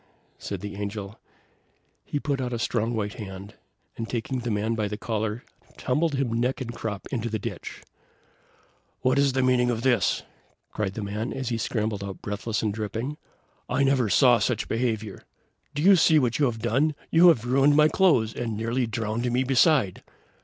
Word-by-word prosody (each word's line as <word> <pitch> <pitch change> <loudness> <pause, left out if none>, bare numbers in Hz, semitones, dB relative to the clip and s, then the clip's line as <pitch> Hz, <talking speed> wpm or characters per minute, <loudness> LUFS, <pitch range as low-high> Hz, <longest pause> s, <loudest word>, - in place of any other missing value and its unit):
said 100 -3 -5
the 100 0 -6
Angel. 105 0 -5 0.8
He 145 - -3
put 140 -2 -2
out 125 -1 -3
a - - -1
strong 115 0 -1
white 105 -1 -2
hand, 100 -2 -8 0.4
and 115 - -5
taking 125 +2 -2
the 120 0 -4
man 110 +1 0
by 110 -2 -1
the 105 +1 -5
collar, 110 +1 -3 0.3
tumbled 150 +4 0
him 135 -4 -1
neck 125 +4 0
and 120 -3 -5
crop 110 -3 -5
into 120 -3 -2
the 110 - -1
ditch. 100 - -7 1.2
"What 130 +1 +2
is 140 -2 +3
the 130 0 +1
meaning 125 -1 +3
of 115 -1 -2
this?" 120 -7 +2 0.5
cried 100 -2 -3
the 110 - -4
man, 105 +4 -3
as 130 -2 -3
he 115 - -1
scrambled 110 -3 -2
out 100 -1 -6
breathless 105 +1 -3
and 105 -2 0
dripping. 115 +7 -4 0.5
"I 140 - +2
never 135 -5 +2
saw 120 +4 +5
such 120 - -1
behavior. 110 -3 -2 0.5
Do 145 - -1
you 195 +2 +8
see 160 -2 +5
what 125 -4 +1
you 145 - +4
have 120 -3 -1
done? 135 +6 +1 0.2
you 170 +2 +7
have 130 -10 +4
ruined 135 +3 +4
my 150 0 +6
clothes, 150 - +3
and 115 -3 -3
nearly 115 +3 -1
drowned 115 +2 -2
me 125 +2 +2
beside." 130 - +3
120 Hz, 185 wpm, -26 LUFS, 110-130 Hz, 1.2 s, you